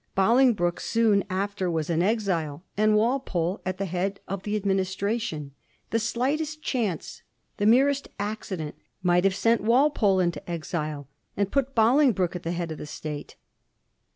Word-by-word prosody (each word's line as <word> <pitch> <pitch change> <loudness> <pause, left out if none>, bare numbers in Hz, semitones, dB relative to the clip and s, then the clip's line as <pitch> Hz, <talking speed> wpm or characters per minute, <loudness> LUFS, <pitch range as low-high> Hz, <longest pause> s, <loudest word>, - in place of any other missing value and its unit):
Bolingbroke 210 -4 +3
soon 220 -3 +2
after 195 0 -1
was 160 -2 -1
in 170 -1 +1
exile, 180 -7 0
and 215 +1 +3
Walpole 210 -6 0
at 185 0 -2
the 195 - -2
head 190 +2 -2
of 195 0 -4
the 210 +2 -2
administration. 195 -4 -1 0.4
The 230 - +2
slightest 290 +7 -1
chance, 215 - -2 0.4
the 205 - +1
merest 275 +4 +4
accident, 200 -7 -4 0.3
might 180 0 +3
have 195 -1 +3
sent 230 +3 +2
Walpole 230 -4 +3
into 175 -1 -1
exile, 155 -4 -4 0.3
and 200 -1 0
put 275 -1 0
Bolingbroke 225 - +3
at 175 - -4
the 165 - -3
head 170 -1 -3
of 155 - -6
the - - -7
state. 150 0 -6
200 Hz, 150 wpm, -26 LUFS, 175-230 Hz, 0.4 s, merest